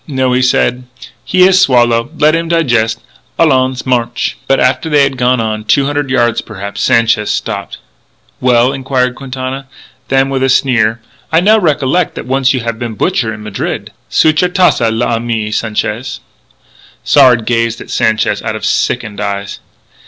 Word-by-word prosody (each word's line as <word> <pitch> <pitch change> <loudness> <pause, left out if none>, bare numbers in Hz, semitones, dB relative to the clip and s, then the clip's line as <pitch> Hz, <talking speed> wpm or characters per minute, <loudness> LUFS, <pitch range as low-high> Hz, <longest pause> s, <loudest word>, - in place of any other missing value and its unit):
"No," 130 -3 0
he 125 - +2
said, 125 0 +1 0.4
"he 185 - +1
has 190 0 +4
swallow. 120 -6 +3
Let 155 +1 +3
him 165 0 -1
digest. 120 -9 +1 0.4
Allons! 130 -5 +1
March!" 120 -2 -1
But 135 - +2
after 130 +5 +1
they 145 -2 +4
had 135 -1 0
gone 125 0 +1
on 110 -1 -2
two 135 +6 +2
hundred 145 -1 -2
yards, 120 -3 +1
perhaps 100 -2 -7
Sanchez 115 -2 +2
stopped. - - -4 0.6
"Well?" 125 +1 +2
inquired 130 -2 -1
Quintana. 130 +1 -6 0.4
Then, 135 +1 +1
with 135 -1 -1
a 135 - +2
sneer: 120 -4 +1 0.3
"I 160 - +4
now 215 +5 +4
recollec' 155 -1 0
that - - -6
once 135 +1 +1
you 130 - -1
have 115 -1 -4
been 120 -2 -4
a - - -11
butcher 130 - 0
in 110 -1 -8
Madrid.... 105 -2 -4 0.2
Suit 155 0 +3
your 180 - +1
tas'e, 180 -10 +2
l'ami 115 -1 -2
Sanchez." 110 +3 -3 0.8
Sard 120 -3 +4
gazed 115 -1 0
at - - -10
Sanchez 110 -2 0
out - - -3
of - - -5
sickened 105 -2 -1
eyes. 100 -1 -4
125 Hz, 165 wpm, -13 LUFS, 115-135 Hz, 0.8 s, has